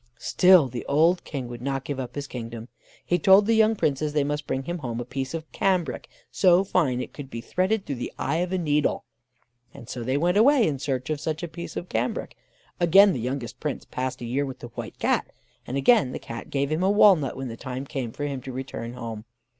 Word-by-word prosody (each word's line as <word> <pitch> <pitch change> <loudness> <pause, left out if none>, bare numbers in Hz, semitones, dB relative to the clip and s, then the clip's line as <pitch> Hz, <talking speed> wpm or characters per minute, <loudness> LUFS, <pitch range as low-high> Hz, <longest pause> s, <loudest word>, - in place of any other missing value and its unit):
Still 180 -6 +5
the 125 -1 -6
old 165 +5 +3
King 135 -5 -5
would 120 -1 -8
not 135 0 -2
give 140 -1 -4
up 125 -2 -6
his 145 -1 -3
kingdom. 115 -2 -7 0.4
He 175 - +1
told 195 +4 +6
the 230 - +3
young 220 0 +4
Princes 150 -4 0
they 150 -2 +2
must 145 0 -3
bring 130 - -2
him 175 +4 -4
home 120 -5 -4
a 120 - -4
piece 135 +4 -4
of 160 -1 -7
cambric 180 -9 0 0.2
so 185 0 +4
fine 165 -10 +1
that 125 - -1
it - - -11
could 140 -3 -8
be 115 - -6
threaded 190 - -1
through 140 - -4
the 120 - -4
eye 155 +4 -1
of 175 +1 -1
a 185 - +1
needle; 150 -4 +1 0.7
and 120 - -11
so 125 - -5
they 130 +4 0
went 175 +5 +2
away 255 +2 +5
in 140 -4 -2
search 130 0 -2
of 150 -2 -2
such 160 +1 -3
a - - -2
piece 170 +1 -8
of 175 - -5
cambric. 115 -2 -2 0.4
Again 190 +3 +6
the - - -3
youngest 125 -1 -4
Prince 150 -2 -4
passed 130 0 -4
a - - -4
year 130 +4 0
with 135 -2 -5
the 120 - -9
White - - -8
Cat, - - +1 0.4
and 130 - -2
again 140 - +4
the - - -3
Cat 115 0 -8
gave 140 +1 -1
him 155 +3 0
a 190 - +3
walnut 195 -11 +5
when 135 -1 -4
the 115 - -6
time 130 +3 -6
came 135 -5 -4
for 145 - -6
him 140 -3 -3
to 130 - -7
return 125 -2 -6
home. 115 -3 -6
140 Hz, 240 wpm, -25 LUFS, 125-175 Hz, 0.7 s, told